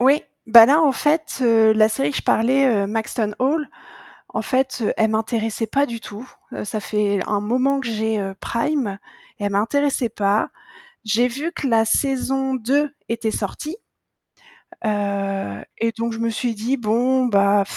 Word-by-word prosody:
Oui, 275 Hz, +4 st, +4 dB, 0.2 s
ben 225 Hz, 0 st, +9 dB
là, 300 Hz, +5 st, +4 dB
en 290 Hz, -3 st, +4 dB
fait, 305 Hz, +3 st, 0 dB
heu, 225 Hz, -3 st, +5 dB
la 215 Hz, 0 st, +4 dB
série 145 Hz, -10 st, -1 dB
que -, -, -4 dB
je -, -, -2 dB
parlais, 265 Hz, +5 st, +3 dB
heu, 205 Hz, -6 st, +2 dB
Maxton 220 Hz, 0 st, -2 dB
Hall, 290 Hz, +4 st, 0 dB, 0.6 s
en -, -, -3 dB
fait, 260 Hz, -1 st, -1 dB
heu, 210 Hz, -, +1 dB
elle 220 Hz, -1 st, +2 dB
m'intéressait 225 Hz, 0 st, -1 dB
pas 280 Hz, +5 st, +1 dB
du 235 Hz, -3 st, -6 dB
tout. 215 Hz, +3 st, -9 dB, 0.3 s
Heu, -, -, -5 dB
ça 215 Hz, +1 st, -4 dB
fait 205 Hz, 0 st, 0 dB
un 205 Hz, -1 st, 0 dB
moment 255 Hz, +6 st, +1 dB
que 260 Hz, -, -6 dB
j'ai, 220 Hz, -1 st, -1 dB
heu, 195 Hz, -1 st, -4 dB
Prime, 235 Hz, -4 st, -2 dB, 0.4 s
et 205 Hz, -, -5 dB
elle 200 Hz, -, -1 dB
m'intéressait 250 Hz, +5 st, +1 dB
pas. 205 Hz, 0 st, 0 dB, 0.5 s
J'ai 225 Hz, +3 st, +2 dB
vu 285 Hz, +7 st, -4 dB
que 300 Hz, -5 st, -3 dB
la 225 Hz, -2 st, +3 dB
saison 270 Hz, +2 st, 0 dB
2 275 Hz, +4 st, 0 dB, 0.2 s
était 230 Hz, -1 st, -1 dB
sortie, 300 Hz, -, -4 dB, 1.1 s
heu, 195 Hz, -, -2 dB
et 230 Hz, 0 st, 0 dB
donc 230 Hz, +1 st, -3 dB
je 225 Hz, -, -6 dB
me 230 Hz, 0 st, 0 dB
suis 230 Hz, +1 st, -2 dB
dit: 230 Hz, +6 st, -1 dB
«Bon, 245 Hz, +3 st, +1 dB
bah 200 Hz, -2 st, +3 dB
230 Hz, 175 wpm, -21 LUFS, 210-265 Hz, 1.1 s, ben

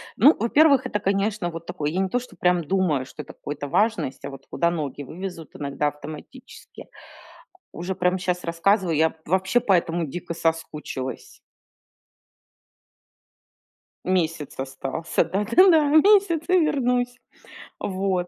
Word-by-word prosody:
Ну, 285 Hz, -, +6 dB
во-первых, 275 Hz, +3 st, +4 dB
это, 210 Hz, -, -2 dB
конечно, 195 Hz, -1 st, 0 dB
вот 165 Hz, 0 st, -8 dB
такое, 150 Hz, -2 st, -3 dB
я 175 Hz, +5 st, -2 dB
не 190 Hz, -, -1 dB
то, 245 Hz, -, 0 dB
что 250 Hz, -, -13 dB
прям 180 Hz, -1 st, +2 dB
думаю, 160 Hz, -5 st, +1 dB
что 150 Hz, -, -9 dB
это -, -, -12 dB
какой-то 145 Hz, 0 st, -6 dB
важность, 180 Hz, -, 0 dB
а -, -, -4 dB
вот 135 Hz, -1 st, -11 dB
куда 170 Hz, -, +1 dB
ноги 150 Hz, -5 st, -4 dB
вывезут 170 Hz, +2 st, -8 dB
иногда 145 Hz, 0 st, -2 dB
автоматически. 150 Hz, -, -10 dB, 0.9 s
Уже 180 Hz, +3 st, -5 dB
прям 180 Hz, 0 st, +1 dB
щас 180 Hz, -1 st, -2 dB
рассказываю, 170 Hz, +1 st, +1 dB
я 160 Hz, +1 st, +2 dB
вообще 190 Hz, +6 st, +2 dB
по 210 Hz, -, +1 dB
этому 170 Hz, -2 st, +1 dB
дико 170 Hz, +4 st, -6 dB
соскучилась. 160 Hz, -6 st, -4 dB, 2.7 s
Месяц 165 Hz, -5 st, -1 dB
остался, 135 Hz, +5 st, -2 dB
да-да-да, 290 Hz, -, +4 dB
месяц 340 Hz, +1 st, +5 dB
и 365 Hz, 0 st, +5 dB
вернусь. 250 Hz, -5 st, 0 dB, 0.6 s
Вот. 185 Hz, -2 st, -1 dB
180 Hz, 130 wpm, -24 LUFS, 155-220 Hz, 2.7 s, Ну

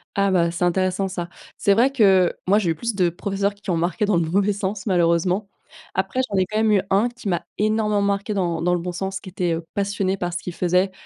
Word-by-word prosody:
Ah 200 Hz, 0 st, +2 dB
bah, 170 Hz, -3 st, +2 dB
c'est 170 Hz, +1 st, -3 dB
intéressant 185 Hz, +2 st, +1 dB
ça. 175 Hz, -2 st, -4 dB, 0.3 s
C'est 200 Hz, -, +3 dB
vrai 250 Hz, +6 st, +3 dB
que, 195 Hz, -8 st, +4 dB, 0.2 s
moi, 205 Hz, +3 st, +4 dB
j'ai 180 Hz, -5 st, -1 dB
eu 160 Hz, -, +1 dB
plus 235 Hz, +7 st, -3 dB
de 180 Hz, -3 st, +2 dB
professeurs 200 Hz, +3 st, -2 dB
qui 200 Hz, -1 st, -10 dB
ont 170 Hz, -, +1 dB
marqué 175 Hz, +6 st, 0 dB
dans 205 Hz, -, +2 dB
le 165 Hz, -2 st, +1 dB
mauvais 200 Hz, +3 st, +2 dB
sens, 195 Hz, 0 st, -4 dB
malheureusement, 180 Hz, +2 st, +1 dB, 0.5 s
après, 260 Hz, -, -1 dB
j'en 200 Hz, -, -1 dB
ai 185 Hz, -, +3 dB
quand 215 Hz, +3 st, -4 dB
même 220 Hz, -1 st, +3 dB
eu 200 Hz, -3 st, +4 dB
1 210 Hz, +5 st, +3 dB
qui 240 Hz, -3 st, -10 dB
m'a 175 Hz, -3 st, 0 dB, 0.2 s
énormément 210 Hz, -1 st, +1 dB
marqué 200 Hz, +1 st, -1 dB
dans 170 Hz, -4 st, -1 dB
dans 180 Hz, +1 st, +2 dB
le 175 Hz, -, -1 dB
bon 180 Hz, +1 st, -4 dB
sens, 190 Hz, +2 st, -4 dB
qui 185 Hz, -, -10 dB
était, 175 Hz, -2 st, -1 dB
heu, 165 Hz, -, -6 dB
passionné 200 Hz, -1 st, -1 dB
par 175 Hz, -1 st, -3 dB
ce 175 Hz, -, -3 dB
qu'il 180 Hz, -, -5 dB
faisait. 180 Hz, +2 st, +1 dB
190 Hz, 250 wpm, -22 LUFS, 175-205 Hz, 0.5 s, que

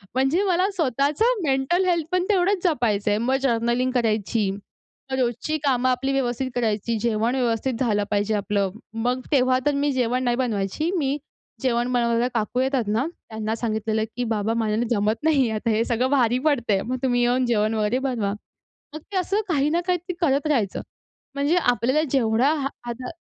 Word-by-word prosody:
म्हणजे 270 Hz, +9 st, +2 dB
मला 370 Hz, +1 st, +2 dB
स्वतःचं 305 Hz, -, +1 dB
मेंटल 280 Hz, +6 st, +1 dB
हेल्थ 340 Hz, -4 st, +1 dB
पण 365 Hz, 0 st, +2 dB
तेवढंच 390 Hz, -1 st, +2 dB
जपायचंय. 220 Hz, -, +1 dB
मग 245 Hz, +4 st, +1 dB
जर्नलिंग 240 Hz, 0 st, +1 dB
करायची. 220 Hz, -3 st, +1 dB, 0.6 s
मग 265 Hz, -, -1 dB
रोजची 250 Hz, +5 st, -1 dB
कामं 255 Hz, -2 st, +2 dB
आपली 255 Hz, +2 st, 0 dB
व्यवस्थित 260 Hz, -1 st, -1 dB
करायची, 225 Hz, -1 st, 0 dB
जेवण 230 Hz, +1 st, +1 dB
व्यवस्थित 245 Hz, 0 st, 0 dB
झालं 210 Hz, -5 st, +1 dB
पाहिजे 205 Hz, +1 st, +1 dB
आपलं. 200 Hz, -1 st, 0 dB, 0.4 s
मग 250 Hz, +1 st, 0 dB
तेव्हा 255 Hz, -2 st, +3 dB
तर 295 Hz, -, +3 dB
मी 285 Hz, +1 st, +1 dB
जेवण 250 Hz, -1 st, 0 dB
नाही 240 Hz, -1 st, +1 dB
बनवायची, 240 Hz, -, -1 dB
मी 280 Hz, -2 st, 0 dB, 0.4 s
जेवण 245 Hz, -2 st, 0 dB
बनवायला 235 Hz, 0 st, +2 dB
काकू 230 Hz, +2 st, -1 dB
येतात 260 Hz, -4 st, 0 dB
ना 220 Hz, +6 st, +1 dB
त्यांना 220 Hz, -9 st, -5 dB
सांगितलेलं, 220 Hz, -1 st, -1 dB
की 245 Hz, -, 0 dB
"बाबा 220 Hz, -1 st, -1 dB
माझ्याने 225 Hz, +1 st, 0 dB
जमत 215 Hz, -1 st, +1 dB
नाही. 280 Hz, -7 st, +3 dB
आता 220 Hz, +2 st, -2 dB
हे 220 Hz, +1 st, +2 dB
सगळं 245 Hz, +2 st, 0 dB
भारी 250 Hz, -4 st, +3 dB
पडत 280 Hz, -7 st, +1 dB
आहे, 195 Hz, -1 st, +2 dB
मग 255 Hz, +4 st, -3 dB
तुम्ही 245 Hz, -2 st, +2 dB
येऊन 245 Hz, +1 st, +2 dB
जेवण 220 Hz, -2 st, +1 dB
वगैरे 215 Hz, +3 st, 0 dB
बनवा." 245 Hz, -7 st, -1 dB, 0.6 s
मग -, -, -5 dB
ते 390 Hz, -, -1 dB
असं 390 Hz, +3 st, 0 dB
काही 295 Hz, -3 st, +2 dB
ना 335 Hz, +3 st, +1 dB
काही 360 Hz, -1 st, +2 dB
तरी 360 Hz, +2 st, -6 dB
करत 285 Hz, -2 st, +2 dB
राहायचं. 235 Hz, -10 st, 0 dB, 0.5 s
म्हणजे 285 Hz, +4 st, +1 dB, 0.2 s
आपल्याला 245 Hz, +6 st, +1 dB
जेवढा 245 Hz, +1 st, +2 dB
हा 285 Hz, -3 st, -1 dB, 0.2 s
हाता 240 Hz, +1 st, -5 dB
250 Hz, 175 wpm, -23 LUFS, 225-280 Hz, 0.6 s, तेव्हा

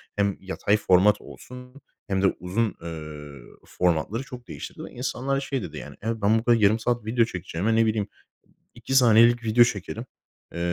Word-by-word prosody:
Hem 100 Hz, -1 st, 0 dB
yatay 95 Hz, +2 st, 0 dB
format 100 Hz, 0 st, +4 dB
olsun 125 Hz, +2 st, -12 dB, 0.3 s
hem 95 Hz, -1 st, 0 dB
de 95 Hz, -, +4 dB
uzun, 100 Hz, +5 st, -1 dB
eee, 75 Hz, -3 st, -8 dB, 0.2 s
formatları 90 Hz, +7 st, -1 dB
çok 125 Hz, -3 st, -11 dB
değiştirdi 70 Hz, -, -8 dB
ve -, -, -9 dB
insanlar 130 Hz, +2 st, -2 dB
şey 135 Hz, -1 st, -3 dB
dedi, 75 Hz, -2 st, -7 dB
yani, 75 Hz, -1 st, -9 dB
"Evet, 115 Hz, +2 st, -2 dB
ben 105 Hz, +2 st, +4 dB
burada 120 Hz, +1 st, +3 dB
yarım 110 Hz, 0 st, +3 dB
saat 120 Hz, 0 st, -1 dB
video 115 Hz, +1 st, +2 dB
çekeceğime, 95 Hz, +1 st, -2 dB
ne 115 Hz, 0 st, +4 dB
bileyim, 110 Hz, -2 st, 0 dB, 0.7 s
2 135 Hz, -, -4 dB
saniyelik 120 Hz, -1 st, +6 dB
video 115 Hz, +2 st, +5 dB
çekerim, 110 Hz, +1 st, -4 dB, 0.5 s
eee, -, -, -5 dB
110 Hz, 170 wpm, -25 LUFS, 95-120 Hz, 0.7 s, saniyelik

